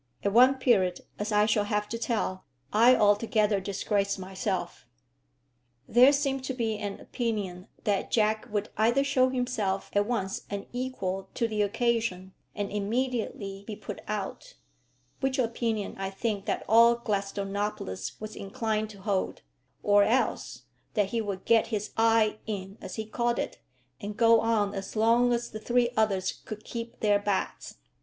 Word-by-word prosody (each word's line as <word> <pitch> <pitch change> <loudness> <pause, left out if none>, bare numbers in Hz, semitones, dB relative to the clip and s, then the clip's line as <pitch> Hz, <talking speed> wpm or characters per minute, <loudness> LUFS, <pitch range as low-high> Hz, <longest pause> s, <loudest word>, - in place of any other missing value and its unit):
At 200 - +1
one 255 +4 +7
period, 205 -9 +2 0.2
as 210 +1 -2
I 210 0 +4
shall 215 -1 +2
have 210 0 -1
to 230 - -3
tell, 215 -5 -2 0.3
I 235 +4 +7
altogether 210 -1 +3
disgraced 200 +1 -1
myself. 190 +1 -4 1.0
There 250 +4 +7
seemed 275 -2 0
to 265 - -3
be 225 -3 -1
an 205 -1 -4
opinion 205 -6 -3 0.2
that 205 -3 0
Jack 220 +1 +1
would 205 0 -1
either 235 +6 +3
show 265 -2 +3
himself 245 -7 -1
at 205 0 +2
once 195 -5 -2
unequal 200 -3 -4
to 230 - +1
the 215 -2 -1
occasion, 215 -3 0 0.2
and 205 -1 -3
immediately 210 -2 -2
be 215 - -4
put - - -8
out, - - -5 0.6
which 270 0 0
opinion 230 -3 -1
I 195 0 -2
think 200 0 -3
that - - -2
all 230 +2 +7
Gladstonopolis 200 - -3
was 215 0 -7
inclined 215 +2 -2
to 200 -2 -12
hold, 195 -2 -1 0.4
or 205 0 +5
else 235 +6 0 0.3
that 205 -3 +2
he 230 +2 -1
would 200 -3 -5
get 230 -1 +4
his 210 -2 -3
"eye 225 -1 +3
in" 195 -1 -5
as - - -7
he 220 - -4
called 235 +2 0
it, - - -3 0.4
and 205 +1 -6
go 230 -1 +6
on 215 -3 +1
as 195 +2 -6
long 230 +3 +4
as 240 0 -1
the 215 - -6
three 240 +1 +1
others 195 -4 0
could 215 0 -7
keep 230 0 -7
their 205 -1 +4
bats. 205 -1 -2
215 Hz, 155 wpm, -28 LUFS, 200-235 Hz, 1.0 s, one